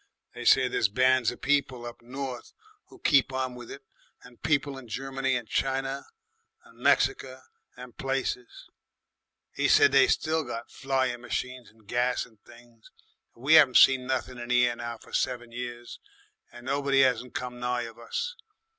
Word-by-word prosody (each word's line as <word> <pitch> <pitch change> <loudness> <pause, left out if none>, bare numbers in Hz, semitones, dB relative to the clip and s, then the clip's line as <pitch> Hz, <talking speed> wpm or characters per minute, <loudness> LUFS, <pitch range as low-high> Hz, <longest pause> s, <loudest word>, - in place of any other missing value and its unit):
They - - -8
say - - +5
there's - - +1
bands 130 +2 +3
of 120 - -9
people 130 -3 0
up 120 - -9
north 130 0 -7 0.3
who - - -16
keep 140 - +3
on 130 -1 -2
with 120 -1 -10
it 140 0 -10 0.4
and 125 -1 -17
people 140 -2 0
in 125 - -13
Germany 135 +3 -2
and 120 -2 -4
China 135 +3 -2 0.6
and - - -20
'Merica 130 0 +1 0.3
and 125 -1 -11
places. 135 -2 -4 0.9
'E - - +3
said 140 - +6
they 135 -1 +6
still 160 0 +1
got 120 -3 -7
flying 130 -3 -1
machines 125 0 -5
and 110 0 -25
gas 125 +2 0
and 110 -4 -23
things. 120 -1 -18 0.5
But 115 - -19
we 155 +4 +7
'aven't 135 -5 +5
seen 130 -1 +6
nothin' 130 -1 -3
in 120 0 -7
the 125 0 +4
air 120 -1 -1
now 120 0 -6
for - - -18
seven 120 -2 -2
years, 120 0 -7 0.5
and 120 0 -13
nobody 135 0 +3
'asn't 125 -1 -1
come 125 -1 -5
nigh 125 0 -1
of 115 0 -10
us. 470 - -4
125 Hz, 170 wpm, -27 LUFS, 120-135 Hz, 0.9 s, we